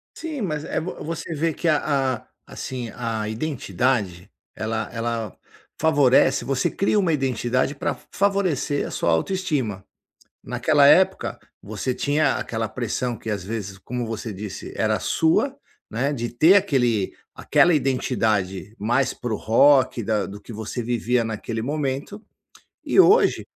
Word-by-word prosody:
Sim, 310 -6 -5
mas, 155 -6 -2
eh - - -5
eh - - +3
vo 170 +3 -5
você 165 +1 -5
vê 160 +1 0
que 170 - -3
a 155 - +4 0.4
a, - - -21 0.2
assim, 125 -3 -6
a 115 -3 -3
identidade, 110 - -1 0.3
ela 110 0 -3
ela 115 -2 -3 0.4
favorece 145 -5 +4
você 135 -2 0
cria 200 +2 +1
uma 175 -4 +2
identidade 130 -1 0
pra - - -1
fa - - -18
favorecer 190 -8 0
a - - -8
sua 85 - 0
autoestima. 130 - -1 0.6
Naquela - - +3
época, - - +4 0.2
você 110 +5 -3
tinha 150 +4 +1
aquela 110 -1 -3
pressão 120 0 -3
que, 110 - -7
às 100 -3 -3
vezes, 100 -2 -5
como 120 +3 -4
você 110 0 -5
disse 100 0 -7
era - - +1
sua, 265 - +1 0.3
né, 135 +7 -1
de 120 -3 -3
ter 160 +10 +5
aquele 125 - +2 0.2
aquela 175 - +3
identidade 110 -8 0
mais 120 +5 +1
para 120 -2 -4
o - - -1
rock 130 +2 +4
da 105 -2 0
do 100 +1 -9
que 115 - -10
você 110 +3 -4
vivia 120 +1 0
naquele 110 +1 -4
momento, 145 - -3 0.6
e - - +2
hoje, 410 +5 +5
125 Hz, 150 wpm, -23 LUFS, 110-150 Hz, 0.6 s, ter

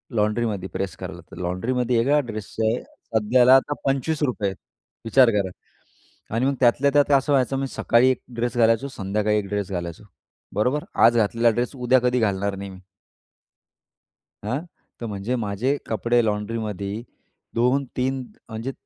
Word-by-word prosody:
लॉन्ड्रीमध्ये 105 -2 0
press 95 -3 -3
करायला, - - -7
तर - - -11
लॉन्ड्रीमध्ये 115 +7 0
एका 145 +5 +3
ड्रेसचे 110 +1 -2
सध्याला 120 +4 +3
आता 140 +2 +2
₹25 135 -5 0
आहेत, 95 - -8 0.5
विचार 125 +2 +5
करा! 100 -3 0 0.8
आणि 125 +3 +1
मग 140 - +1
त्यातल्या 135 +3 +4
त्यात 145 0 +3
असं 140 +2 -1
व्हायचं, 135 0 +2
मी 135 - -1
सकाळी 125 0 +3
एक - - -3
ड्रेस 120 0 -2
घालायचो, 115 +3 +3
संध्याकाळी 105 -1 -1
एक 100 -2 -2
ड्रेस 100 -2 -2
घालायचो, 85 +1 -5 0.5
बरोबर? 125 +8 +1 0.2
आज 120 0 +5
घातलेला 115 +2 +3
ड्रेस 120 +4 -2
उद्या 125 0 +3
कधी 125 0 +2
घालणार 100 -2 0
नाही 100 0 -6
मी. 95 - -12 1.6
हां. 125 +7 -1 0.4
तर - - -3
म्हणजे 105 +4 -3
माझे 115 +5 -1
कपडे 115 +2 +1
लॉन्ड्रीमध्ये 105 -1 -3 0.5
2-3 130 +1 0 0.3
म्हणजे 115 +4 -4
115 Hz, 145 wpm, -23 LUFS, 105-130 Hz, 1.6 s, विचार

